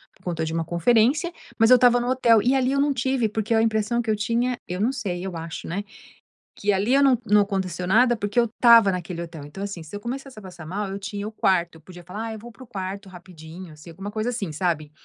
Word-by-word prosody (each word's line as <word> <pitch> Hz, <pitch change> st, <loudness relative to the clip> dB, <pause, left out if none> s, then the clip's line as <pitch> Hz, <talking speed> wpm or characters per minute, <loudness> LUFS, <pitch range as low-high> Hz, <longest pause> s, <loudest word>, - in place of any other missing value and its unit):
por -, -, -27 dB
conta 165 Hz, -3 st, -2 dB
de 160 Hz, -, -4 dB
uma 165 Hz, -, -1 dB
conferência, 235 Hz, -, +2 dB, 0.3 s
mas 225 Hz, +2 st, +5 dB
eu -, -, +10 dB
estava 245 Hz, 0 st, +5 dB
no 240 Hz, -, -3 dB
hotel 235 Hz, -4 st, +4 dB
e 255 Hz, +3 st, +3 dB
ali 260 Hz, 0 st, +1 dB
eu 275 Hz, -, +1 dB
não 285 Hz, -1 st, +2 dB
tive, 260 Hz, -2 st, 0 dB
porque 220 Hz, +1 st, -1 dB
a 220 Hz, -, +4 dB
impressão 225 Hz, +1 st, +1 dB
que 220 Hz, -, -1 dB
eu 215 Hz, -, +2 dB
tinha, 235 Hz, +4 st, 0 dB
eu 180 Hz, +1 st, -4 dB
não 225 Hz, +6 st, +1 dB
sei, 185 Hz, -8 st, -4 dB
eu 190 Hz, -2 st, -5 dB
acho, 165 Hz, 0 st, -7 dB
né. 190 Hz, +5 st, -3 dB, 0.7 s
Que 205 Hz, 0 st, 0 dB
ali 200 Hz, +6 st, +1 dB
eu 280 Hz, -, +5 dB
não 265 Hz, -3 st, +5 dB
não 210 Hz, -1 st, +5 dB
aconteceu 185 Hz, -3 st, -2 dB
nada, 240 Hz, +4 st, +4 dB
porque 205 Hz, +2 st, -1 dB
eu 235 Hz, -, +4 dB
estava 230 Hz, -2 st, +5 dB
naquele 180 Hz, -1 st, -5 dB
hotel. 165 Hz, -3 st, -9 dB
Então, 170 Hz, +7 st, -8 dB
assim, 200 Hz, -4 st, -5 dB
se 160 Hz, +5 st, -10 dB
eu -, -, -5 dB
começasse 260 Hz, +2 st, -7 dB
a -, -, -9 dB
passar 180 Hz, -5 st, -11 dB
mal, 200 Hz, +4 st, -3 dB
eu 195 Hz, +1 st, -5 dB
tinha 200 Hz, +1 st, -5 dB
o 220 Hz, -, -6 dB
quarto, 175 Hz, -5 st, 0 dB
eu 160 Hz, -, -19 dB
podia 175 Hz, +2 st, -13 dB
falar: 205 Hz, +6 st, -6 dB
"Ah, 225 Hz, -, -5 dB
eu 220 Hz, -, -7 dB
vou 240 Hz, +3 st, -11 dB
para 260 Hz, -, -14 dB
o -, -, -15 dB
quarto 195 Hz, -2 st, -6 dB
rapidinho, 175 Hz, -1 st, -12 dB
assim", 150 Hz, +3 st, -14 dB
alguma 195 Hz, +5 st, -7 dB
coisa 215 Hz, +3 st, -2 dB
assim, 220 Hz, -8 st, -3 dB
sabe. 155 Hz, -2 st, -2 dB
205 Hz, 265 wpm, -24 LUFS, 180-235 Hz, 0.7 s, eu